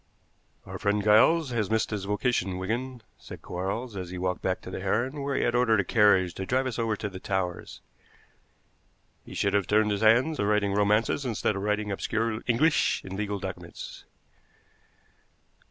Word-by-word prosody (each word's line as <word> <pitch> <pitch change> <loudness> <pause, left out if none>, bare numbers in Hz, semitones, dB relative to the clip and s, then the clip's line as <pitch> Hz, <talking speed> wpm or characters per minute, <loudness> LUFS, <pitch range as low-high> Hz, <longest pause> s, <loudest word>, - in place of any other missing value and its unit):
"Our - - -7
friend 105 0 0
Giles 130 +8 +4
has 110 -5 -1
missed 110 0 0
his 100 -2 -3
vocation, 105 -3 -1
Wigan," 120 +5 -4 0.2
said - - -11
Quarles, 100 +6 -4
as 90 -2 -5
he 90 - -6
walked 90 0 -2
back 95 0 -1
to 95 - -9
the - - -5
Heron, 120 +9 -1
where 140 0 -2
he - - +1
had 120 - +1
ordered 120 -3 +3
a - - +2
carriage 95 -4 +3
to 95 - -5
drive 130 +1 +1
us 125 -2 -3
over 115 -2 0
to 105 - -4
the 95 -2 -8
Towers; 95 -3 -3 1.4
"he - - -11
should 100 - 0
have 100 -2 +1
turned 105 0 +3
his 100 0 -1
hand 120 +8 +4
to 100 - 0
writing 105 -1 +1
romances 105 +6 +2
instead 115 -4 -1
of 95 - -3
writing 105 0 -1
obscure 110 +3 -2
English 150 +7 +2
in 95 0 -6
legal 100 0 -2
documents." 95 -1 -8
105 Hz, 180 wpm, -27 LUFS, 95-120 Hz, 1.4 s, Giles